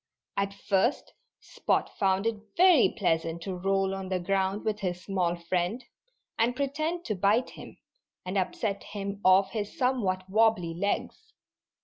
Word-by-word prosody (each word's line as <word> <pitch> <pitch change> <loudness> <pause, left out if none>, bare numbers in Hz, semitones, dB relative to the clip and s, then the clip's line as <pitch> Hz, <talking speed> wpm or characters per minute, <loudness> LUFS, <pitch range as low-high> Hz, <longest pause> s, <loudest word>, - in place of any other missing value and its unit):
At 200 0 -1
first 200 +5 0 0.3
Spot - - -1
found 195 0 +2
it 225 -2 0 0.2
very 360 -6 +6
pleasant 165 -3 0
to 190 - -4
roll 195 +1 0
on 190 -1 -5
the 185 -1 0
ground 195 +3 -1
with 215 -1 -1
his 180 -2 -3
small 180 -3 0
friend, 175 +7 -2 0.5
and 235 +2 +2
pretend 310 +5 -2
to 215 - -1
bite 205 +6 +2
him, - - -11 0.5
and 185 +2 -4
upset 195 +2 -1
him 200 0 -6
off 190 +1 +5
his 210 +6 -4
somewhat 215 - 0
wobbly 205 -4 +2
legs. 205 - -3
195 Hz, 145 wpm, -28 LUFS, 185-225 Hz, 0.5 s, very